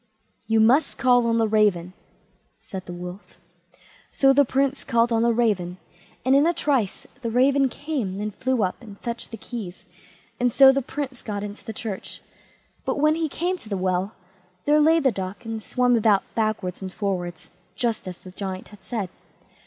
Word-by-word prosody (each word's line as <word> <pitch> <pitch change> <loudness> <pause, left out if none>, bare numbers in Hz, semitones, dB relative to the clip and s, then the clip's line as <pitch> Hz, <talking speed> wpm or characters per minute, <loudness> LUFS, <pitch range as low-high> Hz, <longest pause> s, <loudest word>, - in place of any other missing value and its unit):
"You 225 0 +3
must 245 +8 +4
call 245 -2 +4
on 230 0 +2
the 225 -1 +3
raven", 205 -5 +2 0.7
said 190 -1 -8
the - - -6
Wolf. 180 +2 -9 0.7
So 270 -1 +4
the 285 +1 +6
Prince 275 +1 0
called 235 -2 +2
on 225 - +2
the 235 0 +4
raven, 205 -7 0 0.5
and 260 +1 +5
in 285 +3 +5
a 340 - +1
trice 260 -11 0 0.2
the 235 - -2
raven 270 +3 +3
came, 250 -10 -3
and 210 0 -3
flew 255 +1 0
up 185 +5 -2
and 205 -4 -12
fetched 235 -1 -4
the 225 - -7
keys, 205 -5 -7 0.5
and 245 0 +2
so 270 +2 +8
the 275 +1 0
Prince 265 -1 -5
got 205 -2 -4
into 205 0 -7
the - - -6
church. 215 -2 -6 0.6
But - - -1
when 305 +1 +4
he 320 -1 -1
came 360 +5 -2
to 215 - -13
the 200 - -1
well, 185 +2 0 0.5
there 300 +1 +5
lay 320 +2 +5
the 270 -4 +3
duck, 195 +3 -6
and 225 -1 -4
swam 245 +3 +2
about 210 -3 +4
backwards 215 -5 -1
and 190 -1 -5
forwards, 180 -4 -4 0.2
just 230 -1 -1
as 180 -1 -6
the 185 - -12
Giant 190 0 -6
had 205 -3 -16
said. 215 -3 -3
225 Hz, 185 wpm, -24 LUFS, 195-260 Hz, 0.7 s, so